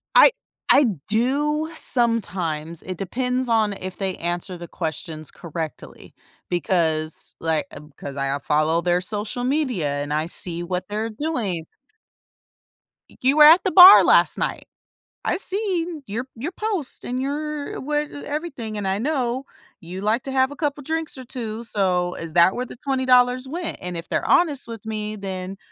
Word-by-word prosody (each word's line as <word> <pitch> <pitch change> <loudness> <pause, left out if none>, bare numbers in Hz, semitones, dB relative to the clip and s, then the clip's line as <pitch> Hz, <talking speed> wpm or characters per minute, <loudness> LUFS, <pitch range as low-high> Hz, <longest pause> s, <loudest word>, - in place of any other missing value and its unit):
I - - +9 0.4
I 280 0 +6 0.2
do 290 +8 +1
sometimes, 180 - -1
it 185 -2 -6
depends 250 +5 -2
on 215 -3 +2
if 185 -1 -7
they 190 -2 -2
answer 175 +2 -3
the 170 0 -9
questions 155 -2 -5
correctly, 160 -2 -7 0.3
because, 165 -3 -1
like, 160 +1 0
I've 150 +1 -11
'cause 140 -1 -7
I 135 0 -1
I - - -4
follow 155 +3 +1
their 175 0 +1
social 210 +5 -3
media 255 - 0 0.2
and 145 +1 -4
I 155 +2 0
see 170 0 0
what 180 +1 -3
they're 215 +2 -3
doing. 215 - -3 1.6
"You 270 +4 +3
were 300 - +9
at 325 +5 +8
the 380 - 0
bar 375 +1 +11
last - - +4
night. - - -2 0.6
I've - - 0
seen 360 -6 0
your 230 +6 -3
you 290 +10 -4
post 390 -8 -3
and 250 +1 -3
your 295 +1 -4
what 295 +1 -1
everything, 285 -7 -5
and 200 -2 -3
I 190 +1 0
know 260 -2 -1 0.4
you 180 +3 -7
like 220 +4 +1
to 270 - -5
have 265 +1 +2
a - - -7
couple 290 -2 -2
drinks 320 0 -3
or 260 - -8
2, 230 -3 -5
so 180 -4 0
is 165 -1 -7
that 175 +2 +5
where 250 +1 -2
the 245 - -11
$20 255 -1 +2
went?" 335 +4 -4
And 180 -1 -4
if 165 - -7
they're - - -1
honest 320 -8 +3
with 225 -1 -8
me, 215 -1 -4
then 190 -1 -5
225 Hz, 165 wpm, -23 LUFS, 180-280 Hz, 1.6 s, bar